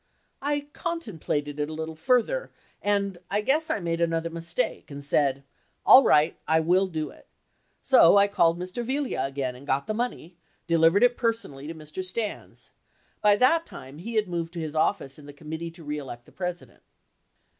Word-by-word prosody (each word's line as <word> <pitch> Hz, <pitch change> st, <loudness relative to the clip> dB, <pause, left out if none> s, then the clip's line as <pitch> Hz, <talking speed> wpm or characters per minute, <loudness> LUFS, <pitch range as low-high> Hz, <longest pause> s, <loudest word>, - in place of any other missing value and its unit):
I 290 Hz, +1 st, 0 dB
contemplated 160 Hz, -, -3 dB
it 150 Hz, 0 st, -1 dB
a -, -, -6 dB
little 160 Hz, 0 st, -5 dB
further, 250 Hz, -, +1 dB, 0.3 s
and 200 Hz, -3 st, 0 dB
I 205 Hz, +1 st, +1 dB
guess 290 Hz, +8 st, +1 dB
I -, -, 0 dB
made 170 Hz, -2 st, -2 dB
another 165 Hz, 0 st, 0 dB
mistake 170 Hz, 0 st, -3 dB
and 140 Hz, 0 st, -8 dB
said, 140 Hz, -1 st, +1 dB, 0.4 s
"All 265 Hz, -, +9 dB
right, 150 Hz, -5 st, +4 dB
I 160 Hz, 0 st, +4 dB
will 180 Hz, +4 st, +3 dB
do 155 Hz, -4 st, -4 dB
it." -, -, -19 dB, 0.6 s
So 205 Hz, -8 st, +6 dB
I 200 Hz, -, +6 dB
called 170 Hz, -4 st, +2 dB
Mr. 185 Hz, +7 st, -5 dB
Yiglia 265 Hz, -, -1 dB
again 135 Hz, -2 st, -3 dB
and 135 Hz, +3 st, -13 dB
got 135 Hz, 0 st, +1 dB
the 215 Hz, -, -2 dB
money, 215 Hz, -7 st, -4 dB, 0.3 s
delivered 165 Hz, +5 st, +4 dB
it 245 Hz, 0 st, +4 dB
personally 215 Hz, -, -2 dB
to 165 Hz, -, -6 dB
Mr. 155 Hz, +4 st, -7 dB
Stans. 210 Hz, +3 st, -5 dB, 0.5 s
By 210 Hz, -1 st, +5 dB
that 325 Hz, +9 st, +3 dB
time, 135 Hz, +3 st, -11 dB
he 225 Hz, +6 st, -6 dB
had 215 Hz, -2 st, +2 dB
moved 170 Hz, -1 st, -4 dB
to 170 Hz, -, -5 dB
his 155 Hz, -2 st, -4 dB
office 155 Hz, -3 st, 0 dB
in 145 Hz, -, -13 dB
the 145 Hz, -, -10 dB
Committee 160 Hz, +3 st, -6 dB
To 165 Hz, 0 st, -14 dB
Re 150 Hz, 0 st, -3 dB
Elect 120 Hz, -4 st, -9 dB
the -, -, -19 dB
President. 180 Hz, -2 st, -6 dB
170 Hz, 185 wpm, -26 LUFS, 155-210 Hz, 0.6 s, All